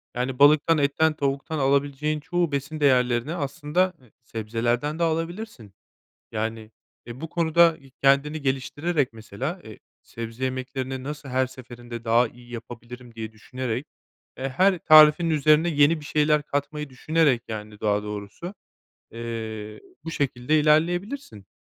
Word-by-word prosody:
yani, 125 +1 -2
balıktan, 150 +3 +6
etten, 150 +2 +2
tavuktan 140 +2 -2
alabileceğin 140 +2 +1
çoğu 175 +1 -1
besin 140 +3 -3
değerlerini, 125 0 +2
aslında, 155 +4 0
e 115 - -25
sebzelerden 120 +7 -2
de - - +2
alabilirsin. 165 - -3 0.6
Yani, 110 0 -3 0.4
e, 120 +2 -9
bu 165 - -5
konuda 165 0 +3 0.2
kendini 140 +3 +3
geliştirerek, 140 +2 -1
mesela, 120 - -5
eee, 110 - -11 0.2
sebze 115 +2 -6
yemeklerini 130 0 -3
nasıl 145 0 -6
her 130 0 +1
seferinde 120 -2 -10
daha 115 +1 +3
iyi 120 +1 -17
yapabilirim 120 +1 -9
diye 110 -1 -6
düşünerek, 125 +3 -4 0.5
e, 135 - -3
her 185 +8 +3
tarifin 155 +1 +7
üzerine 155 +2 +4
yeni 155 0 +3
bir - - -12
şeyler 150 0 +2
katmayı 145 0 -3
düşünerek, 145 -2 +2
yani, 105 -1 -7
daha 105 -1 +1
doğrusu, 105 - -7 0.6
eee, 110 -2 -6 0.2
bu 165 - -5
şekilde 140 0 +1
ilerleyebilirsin. 165 - 0
135 Hz, 130 wpm, -25 LUFS, 120-155 Hz, 0.6 s, tarifin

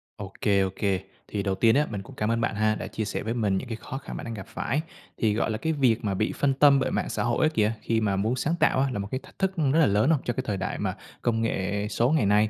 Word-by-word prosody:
Ô - - -7
kê, 100 -1 +3
ô 95 - +1
kê. 100 -3 0 0.3
Thì 100 -1 -3
đầu 95 -1 0
tiên 115 +3 +4
á, 150 +1 +3
mình 100 -3 -4
cũng - - -13
cảm 105 +1 0
ơn 115 - 0
bạn 115 -2 0
ha, 110 +1 +2
đã - - -5
chia 110 - -3
sẻ 105 - -3
với 110 - -2
mình 105 -5 +1
những 130 - -4
cái 115 - -3
khó 120 +4 -7
khăn 135 - -7
bạn - - -6
đang 115 - -5
gặp 100 -4 -7
phải. 150 +3 -2 0.4
Thì, 110 -2 +2
gọi 110 +1 0
là, 110 - -1
cái 160 +7 -1
việc 125 -5 +2
mà 100 - 0
bị 105 +3 0
phân 140 -1 +2
tâm 140 0 +6
bởi 130 - 0
mạng - - -1
xã - - -1
hội 120 +6 +2
á - - +4
kìa, 110 +1 +2
khi 115 -1 0
mà 100 -2 +1
muốn 110 +6 0
sáng 150 +6 0
tạo - - +3
á, 135 - +2
là 120 - -3
một 100 - -3
cái 130 - -1
thách - - -18
thức 190 -1 +2
rất 150 0 +3
là 160 - +6
lớn, 105 -2 +3
đúng 160 - +5
không? - - -9
Trong 120 - -1
cái 130 - -2
thời 105 -3 -1
đại 95 - -3
mà - - -1 0.3
công 115 -1 +1
nghệ 100 -1 -1
số 120 +4 +2
ngày 155 -8 +3
nay, 105 +2 +4
115 Hz, 325 wpm, -26 LUFS, 105-130 Hz, 0.4 s, tâm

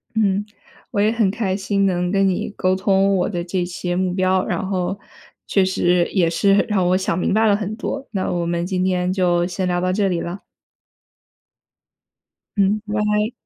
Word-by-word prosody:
嗯， 205 -2 +1 0.5
我 205 - -1
也 210 +2 +3
很 225 -4 +1
开 195 -3 -1
心 200 0 0
能 180 -2 0
跟 195 0 +3
你 185 - -1
沟 185 -2 0
通 195 +1 +2
我 185 - 0
的 175 -4 -3
这 180 +1 -2
些 175 0 -3
目 185 0 0
标， 185 0 +1
然 - - -2
后， 190 0 -2 0.5
确 195 - +3
实 180 -2 +2
也 175 -4 +2
是 195 +4 +2
让 200 -5 +1
我 185 - +3
想 185 -3 -1
明 180 - 0
白 220 +2 +3
了 205 - +4
很 210 0 -3
多， 275 +3 -4
那 190 -3 -2
我 175 -1 -1
们 170 0 -1
今 185 0 -1
天 180 -1 0
就 175 -2 +2
先 185 +1 -2
聊 175 0 0
到 185 +1 0
这 200 0 +1
里 175 -2 -1
了。 175 +4 -5 2.2
嗯， 200 +1 +2
拜。 210 +1 0
190 Hz, 200 characters per minute, -20 LUFS, 180-200 Hz, 2.2 s, 了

